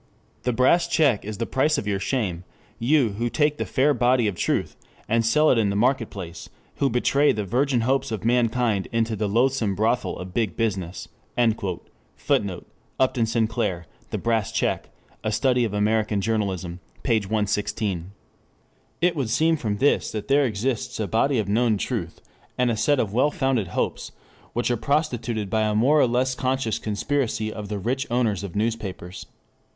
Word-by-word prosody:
The 125 - 0
Brass 130 +8 +3
check 140 -10 +2
is 105 0 -6
the 115 - -2
price 150 +5 +1
of 125 - -3
your 100 -2 -1
shame 95 -6 -2 0.4
you 130 0 +3
who 120 0 0
take 150 +3 +1
the - - -2
fair 145 +2 +3
body 125 -1 +3
of 100 - 0
truth - - -1 0.3
and 115 +2 +2
sell 150 +7 +4
it 120 - +3
in 105 -3 +2
the 100 - -1
market 120 +2 +2
place, 85 -4 -8 0.3
who 140 - +2
betray 140 +4 +3
the 105 -1 -2
virgin 125 +3 +1
hopes 135 +2 0
of 110 0 -4
mankind 115 -4 +1
into 115 -1 0
the 105 0 -1
loathsome 115 -2 +1
brothel 110 -2 0
of 90 0 -8
Big 105 -5 -1
Business." 95 -5 -2 1.1
[Footnote: 95 -4 -1 0.3
Upton 130 -3 +2
Sinclair, 110 -6 -1 0.2
The - - -2
Brass 115 -3 0
Check. - - -1 0.3
A 110 - 0
Study 125 +3 +2
of 110 - -3
American 105 0 +1
Journalism. 95 -5 -2 0.2
p. 115 -4 +3
116.] 105 -3 -2 0.9
It 175 0 +3
would 135 -7 -1
seem 160 +7 +3
from 110 -8 -2
this 140 +6 +2
that 105 -2 -5
there 140 +1 +4
exists 125 +3 -2
a 110 - -1
body 125 +8 +2
of 105 -3 0
known 110 +1 +2
truth, - - -4 0.4
and 125 -1 +2
a - - 0
set 145 +5 +2
of 105 -4 -1
well 130 +6 +3
founded 135 - 0
hopes, - - -2 0.4
which 120 +1 0
are 120 - +1
prostituted 120 -6 -1
by 110 - +2
a 105 -1 +1
more 135 +8 +4
or 130 - +5
less 125 +2 +1
conscious 130 -3 -1
conspiracy 110 0 -1
of 105 -2 -7
the 105 - -2
rich 130 +8 -2
owners 115 -5 0
of 95 -4 -7
newspapers. 105 -5 -3
115 Hz, 175 wpm, -24 LUFS, 105-130 Hz, 1.1 s, or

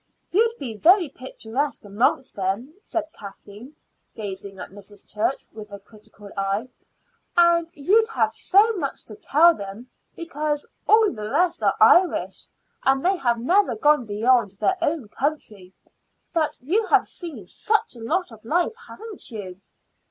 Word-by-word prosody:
"You'd 455 +5 +2
be 235 -5 -5
very 350 - +5
picturesque 260 0 -4
amongst 230 +6 0
them," 200 +9 -3
said 325 -5 -4
Kathleen, 210 +4 -12 0.4
gazing 200 -2 -7
at 180 - -8
Mrs. 205 +1 -11
Church 215 +6 -1
with 215 -1 -10
a 200 - -7
critical 205 0 -16
eye. 195 +5 -2 0.7
"And 340 -1 +4
you'd 410 +10 +3
have 450 - 0
so 420 +4 +4
much 300 -9 -3
to 215 - -9
tell 330 +10 +5
them; 200 +2 -9 0.2
because 300 -3 -3 0.2
all 435 -1 +5
the 215 -1 -6
rest 350 +6 +1
are - - +2
Irish, 360 0 +4 0.3
and 270 +2 +2
they 380 +1 +3
have 240 -7 +1
never 370 - +2
gone 295 - +3
beyond 220 0 +2
their 380 - +1
own 310 -7 -1
country. 210 -8 -4 0.6
But 320 -3 0
you 395 - 0
have - - +4
seen 300 - -6
such 435 - 0
a - - -12
lot 330 +6 -1
of 220 -1 -14
life, 345 - 0
haven't 440 -2 -8
you?" 195 -5 -8
270 Hz, 150 wpm, -23 LUFS, 210-345 Hz, 0.7 s, very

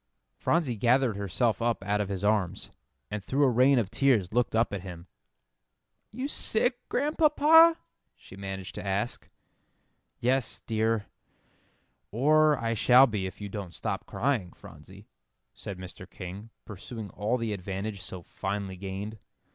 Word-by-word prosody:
Phronsie 145 - 0
gathered 120 +1 +3
herself 100 +2 0
up 115 -3 0
out 105 +1 0
of 100 - -3
his 100 -1 -4
arms, 105 -4 0 0.4
and 105 -1 -4
through 140 +7 +1
a 135 - +5
rain 130 +3 +5
of 110 -5 0
tears 115 -9 +2
looked 120 -1 +1
up 115 -2 +2
at 100 - -3
him. 90 -2 -9 1.1
"Are 220 - -14
you 260 +2 -2
sick, 245 -2 0
Grandpapa?" 310 +3 +5 0.4
she - - -14
managed 95 -1 -6
to - - -6
ask. 100 +4 -2 0.9
"Yes, 130 0 0
dear; 110 -1 0 1.0
or 150 +5 +4
I 115 -1 -1
shall 125 +4 +6
be 105 -6 -2
if 95 - -10
you 100 - -4
don't 100 -3 -7
stop - - -4
crying, 115 -10 -1
Phronsie," - - -14 0.5
said 100 - -7
Mr. 90 0 -10
King, 95 +4 -8 0.2
pursuing 105 0 -8
all 110 +7 -1
the 115 -3 -2
advantage 100 +1 -5
so 90 -1 -8
finely 95 0 -4
gained. 100 +3 -6
110 Hz, 145 wpm, -28 LUFS, 95-130 Hz, 1.1 s, shall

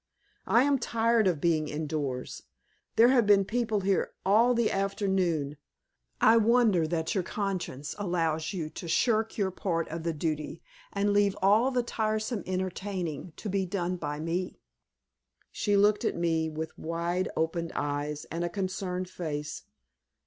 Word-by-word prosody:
"I 235 - +5
am 280 -1 +2
tired 230 -2 +2
of 170 -5 +1
being 155 -1 +1
indoors. 150 -4 -3 0.5
There 235 +2 +7
have 245 -5 +4
been 200 -1 +5
people 220 -1 0
here 195 0 0
all 230 +5 +4
the 235 -1 +2
afternoon. 190 -7 0 0.6
I 225 +1 +6
wonder 225 -7 +4
that 160 0 -1
your 190 - 0
conscience 185 -8 -3
allows 165 -4 0
you 165 -6 -4
to 170 - -7
shirk 225 +4 +1
your 195 -3 +1
part 170 -3 -2
of 165 +1 -4
the 165 +1 -1
duty 155 0 -3 0.3
and 205 0 +1
leave 205 -1 +3
all 215 +6 +5
the 250 -2 0
tiresome 215 -1 -1
entertaining 185 -3 -3
to - - -7
be 195 -1 0
done 180 -1 -1
by 150 -3 -4
me!" 170 +3 -3 0.9
She 205 -1 +1
looked 205 +2 +4
at - - 0
me 165 -2 +1
with 160 +1 -5
wide 170 +3 -1
opened 165 +1 -1
eyes 145 +1 -2
and 165 +2 -2
a 175 - -1
concerned 185 0 -3
face. 150 -5 -5
185 Hz, 150 wpm, -29 LUFS, 160-205 Hz, 0.9 s, There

